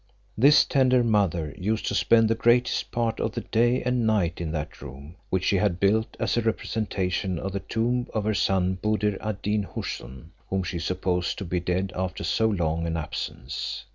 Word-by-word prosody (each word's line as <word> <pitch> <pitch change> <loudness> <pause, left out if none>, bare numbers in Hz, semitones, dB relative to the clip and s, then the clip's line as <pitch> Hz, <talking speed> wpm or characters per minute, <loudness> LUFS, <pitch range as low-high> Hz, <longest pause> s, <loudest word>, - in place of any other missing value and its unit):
This 140 +6 +6
tender 130 -2 +3
mother 90 -9 +1
used 105 +4 -1
to - - -1
spend 115 -1 +4
the 115 - +3
greatest 120 +2 +2
part 115 -1 -1
of 110 - -1
the - - -3
day 120 +3 +1
and 125 -2 +1
night 90 -6 +1
in 80 -2 -3
that 75 -1 -5
room 70 +5 -10 0.2
which 95 0 0
she 100 - +2
had 90 -3 +1
built 110 +3 +1
as - - 0
a 120 - +2
representation 100 -5 -1
of 95 +3 -4
the 100 - -2
tomb 120 +4 -1
of 110 - -1
her 110 +1 +1
son 95 -1 +1
Buddir 105 -2 0
ad 105 -2 -4
Deen 105 0 +1
Houssun, 65 +6 -6 0.2
whom 95 -1 0
she 90 -1 -4
supposed 90 0 -1
to 100 - -5
be 90 +1 -1
dead 90 +2 -1
after 90 0 -3
so 110 - +2
long 85 -5 0
an 85 0 -1
absence. 80 +2 -5
100 Hz, 195 wpm, -26 LUFS, 90-110 Hz, 0.2 s, This